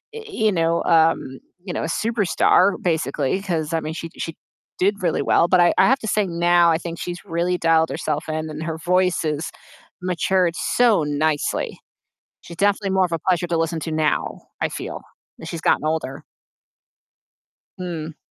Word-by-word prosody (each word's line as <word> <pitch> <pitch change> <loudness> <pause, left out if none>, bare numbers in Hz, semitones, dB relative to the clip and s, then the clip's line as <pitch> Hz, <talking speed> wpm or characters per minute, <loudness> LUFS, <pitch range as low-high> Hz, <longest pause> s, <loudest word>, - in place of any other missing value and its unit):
uh, 450 - -6
you 220 - +1
know, 165 -1 +1
um, 160 -5 +2 0.3
you 180 - -4
know, - - -2
a - - -2
superstar, 200 -1 +2
basically. 160 0 0
'Cause 165 -5 -2
I 165 - +1
mean, 155 +1 -4
she 165 0 -6
she 165 - -5 0.4
did 200 +1 +1
really 170 - +1
well. 170 - +3
But 185 - +4
I 175 - +5
I - - +6
have 265 +2 +3
to 220 - -6
say 210 0 +1
now, 170 0 +3
I 160 - +2
think 170 0 -7
she's 175 +2 -6
really 175 +1 0
dialed 165 -1 +3
herself 155 +1 -3
in, 155 0 -3
and 155 +1 -6
her 160 -1 -3
voice 180 +1 +1
has 155 +1 -2 0.5
matured 180 -1 +1
so 230 -9 +2
nicely. 150 0 -1 0.6
She's 170 - -11
definitely 200 0 +1
more 190 -1 +3
of 170 - -13
a 165 - 0
pleasure 175 +1 0
to 170 -1 -1
listen 165 0 -1
to 160 +1 -4
now, 155 -1 0 0.2
I - - +1
feel, - - -6 0.4
as 160 - -8
she's 165 -2 -5
gotten - - +2
older. 155 -4 -2 1.6
Hmm. 165 -4 -5
170 Hz, 180 wpm, -22 LUFS, 160-185 Hz, 1.6 s, I